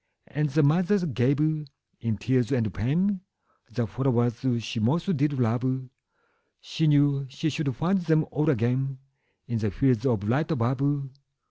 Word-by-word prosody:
'' - - -50
And 150 +1 -1
the 155 +3 +2
mother 180 +6 +3
gave, 135 -1 +1 0.6
in 115 -3 -2
tears 125 +4 0
and 115 -7 0
pain, 180 - 0 0.5
The 120 +2 -1
flowers 120 0 0 0.2
she 120 +1 -4
most 165 - +1
did 145 +1 +1
love; 130 +1 -1 0.7
She 160 - -1
knew 145 -2 +3
she 150 +4 -2
should 140 -3 -2
find 175 - +1
them 160 -3 +2
all 150 +2 +1
again 130 +1 0 0.5
In 115 -1 -2
the 110 0 0
fields 130 +2 +1
of 115 -6 +1
light 145 +7 +1
above. 140 +1 0
135 Hz, 150 wpm, -26 LUFS, 120-155 Hz, 0.7 s, mother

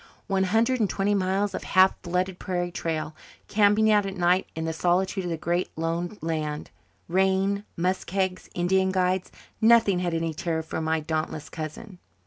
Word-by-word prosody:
One 190 -2 +1
hundred 230 +6 +2
and 210 -4 +2
twenty 200 +1 0
miles 195 +1 0
of - - -4
half 185 0 +5
flooded 180 +1 -2
prairie 175 -1 -2
trail 160 -2 -3 0.3
camping 215 +1 +4
out 210 -1 +4
at 195 0 -6
night 180 +1 +2
in 160 0 -3
the 160 - -2
solitude 185 +3 0
of - - -2
the 165 - -2
Great 175 +3 -1
Lone 170 +5 -2
Land 155 -2 -3 0.4
rain 190 +3 +1
muskegs 185 +1 -1
Indian 190 +2 +2
guides 185 0 0 0.3
nothing 220 -4 +5
had 175 -2 -1
any 165 -1 -1
terror 165 -1 -2
for 160 - -4
my 160 0 0
dauntless 155 -1 -3
cousin. 175 +5 -7
185 Hz, 165 wpm, -26 LUFS, 165-195 Hz, 0.4 s, half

